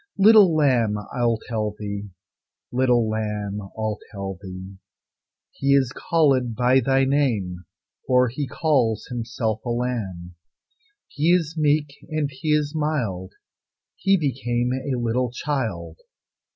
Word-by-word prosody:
Little 200 -4 +7
lamb, 125 -8 +3 0.2
I'll 120 -2 +1
tell 110 -3 -2
thee; 100 -1 -5 0.6
Little 125 -2 +2
lamb, 105 -2 -3
I'll 110 +2 -4
tell 95 -3 -6
thee: 95 0 -9 0.7
He 140 0 +2
is 135 -2 +2
callèd 135 -8 +2
by 125 +2 +4
thy 135 +1 +2
name, 110 -11 0 0.4
For 125 0 +4
He 130 +4 -3
calls 130 -6 +1
Himself 115 -2 -3
a 120 - -4
Lamb. 110 -8 -3 0.7
He 155 +4 +1
is 165 -3 +1
meek, 150 -2 +1 0.2
and 155 -2 -1
He 135 +3 -8
is 150 -1 +2
mild, 125 - -2 0.6
He 195 +1 +3
became 125 -5 -1
a 130 0 -2
little 120 +1 0
child. 110 - -3
125 Hz, 125 wpm, -23 LUFS, 105-145 Hz, 0.7 s, Little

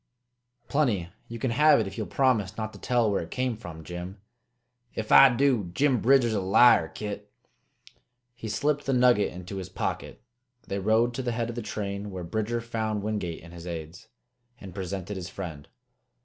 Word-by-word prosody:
"Plenty! 115 - +1 0.2
You 115 - -7
can 120 +1 -1
have 150 +4 +5
it 110 - 0
if 95 0 -7
you'll 110 - -4
promise 115 -8 +1
not 110 -1 -4
to - - -12
tell 120 -4 +1
where 100 - 0
it 85 - -8
came 125 -2 -1
from, 85 -7 -9
Jim." 90 +4 -7 0.8
"If 110 -1 -4
I 135 - +9
do, 120 -7 +2
Jim 135 -4 +3
Bridger's 125 -2 +4
a 100 - 0
liar, 95 -2 +6
Kit!" 105 +2 -7 1.0
He 115 -2 -7
slipped 145 +8 0
the 135 - +2
nugget 125 -4 +4
into 90 +2 -7
his 95 -1 -6
pocket. - - -4 0.5
They 100 - -3
rode 110 +4 +2
to 130 - -3
the 120 -2 -2
head 115 0 -2
of - - -9
the 120 - -3
train, 100 -1 -4
where 95 -2 -6
Bridger 110 +6 -2
found 110 -3 -2
Wingate 105 -7 -3
and 85 0 -12
his 85 0 -9
aids, 85 +4 -7 0.5
and 95 -3 -10
presented 95 +1 -5
his 90 0 -6
friend. 80 -8 -7
105 Hz, 185 wpm, -27 LUFS, 95-120 Hz, 1.0 s, I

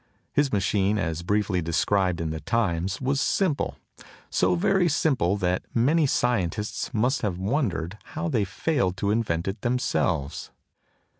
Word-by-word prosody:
His 145 -2 +2
machine, 100 0 +1
as 80 -4 -2
briefly 100 0 0
described 90 +2 +1
in 80 -1 -2
the 80 - -4
Times, 90 0 -1
was 135 +1 0
simple; 180 -8 0 0.6
so 90 0 +2
very 180 - +2
simple 130 - +1
that 90 -2 0
many 145 +6 +3
scientists 110 -5 -1
must 125 +4 +1
have 100 -5 -1
wondered 100 - -1 0.2
how 175 - -1
they 120 -10 +1
failed 95 - -1
to 100 +1 0
invent 100 -7 0
it 95 +3 -3
themselves. 120 - -1
100 Hz, 140 wpm, -26 LUFS, 90-125 Hz, 0.6 s, many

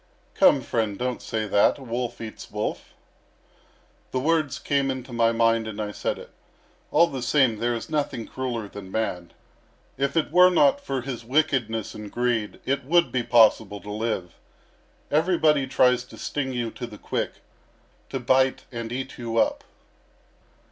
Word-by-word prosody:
"Come, - - +5
friend, 110 -3 -1
don't 125 0 -2
say 110 -1 -2
that; 100 0 +3
a 140 - -11
wolf 120 0 -3
eats 110 -1 -8
wolf." 105 +1 -4 1.1
"The 130 - -1
words 155 -1 +1
came 140 -1 0
into 130 -1 -5
my 115 -1 +3
mind 115 -1 +2
and 110 -1 -6
I 105 -1 -3
said - - -2
it. - - -12 0.6
All 165 +3 +5
the 135 -6 -5
same, 130 -2 +3
there 120 +1 0
is 115 - -5
nothing 145 -6 -2
crueller 120 -5 -4
than 100 -1 -10
man. 90 -5 -3 0.7
If 140 +3 0
it 160 - +1
were 180 +2 +7
not 280 +10 +4
for 135 - -2
his 125 -2 -6
wickedness 125 -5 0
and 105 -1 -8
greed, 120 -3 -1
it 140 +1 0
would 170 +5 +3
be 130 - +1
possible 110 -3 +4
to 105 - -8
live. 105 -5 -3 0.8
Everybody 155 -3 +3
tries 125 -1 +3
to - - -14
sting 135 -3 -3
you 120 -3 -2
to 120 - -6
the 105 -3 -11
quick, - - -3 0.8
to 135 - -3
bite 130 +2 +2
and 115 -2 -5
eat 130 +1 -5
you 115 -1 -3
up." - - +2
120 Hz, 165 wpm, -25 LUFS, 110-135 Hz, 1.1 s, were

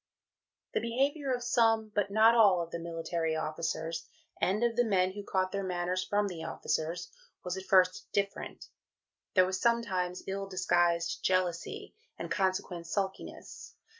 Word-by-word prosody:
The - - +2
behaviour 270 +4 0
of 245 -1 -1
some 225 -3 +3
(but 205 -1 +1
not 220 +3 +6
all) 205 -6 +6
of 170 -1 -4
the 170 - -4
military 165 -1 -2
officers, 160 +1 -3 0.3
and 205 +5 +2
of 235 -1 +2
the 245 - +4
men 190 -4 +2
who 205 +1 -7
caught 185 -1 0
their 200 0 -2
manners 180 0 -1
from 205 +1 +1
the 170 -4 -6
officers, 165 +1 -3 0.3
was 180 0 -3
at 190 0 -7
first 185 -1 +3
different. 200 0 -3 0.7
There 185 -1 +6
was 185 +1 -3
sometimes 190 -7 0
ill 195 0 -3
disguised 175 -2 +1
jealousy, 185 - -1 0.2
and - - -6
consequent 185 -3 -1
sulkiness. 190 +3 -5
185 Hz, 150 wpm, -31 LUFS, 175-210 Hz, 0.7 s, not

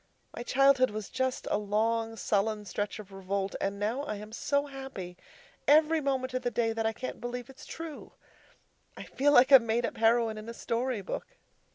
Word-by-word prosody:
My - - -5
childhood 265 +1 +4
was 210 -1 -6
just 260 -1 -2
a - - +2
long, 225 +2 0
sullen 210 0 0
stretch 205 +2 -3
of 205 -2 -11
revolt, 195 0 -3
and 200 +1 -1
now 220 +6 -1
I 285 -7 -4
am 210 +1 -9
so 280 +5 0
happy 265 -11 -8 0.5
every 310 +2 +5
moment 265 -2 -1
of 255 - -1
the 245 - 0
day 230 -2 0
that 225 0 0
I - - +1
can't 255 +3 -6
believe 245 +2 -5
it's 270 +3 -14
true. 325 -2 -8 0.8
I - - -6
feel 290 +2 +1
like 260 0 +6
a 270 - +11
made 230 +1 0
up - - -5
heroine 225 -1 +3
in 215 +2 -9
a 230 - -7
story 235 -2 -2
book. - - -6
230 Hz, 195 wpm, -30 LUFS, 215-265 Hz, 0.8 s, a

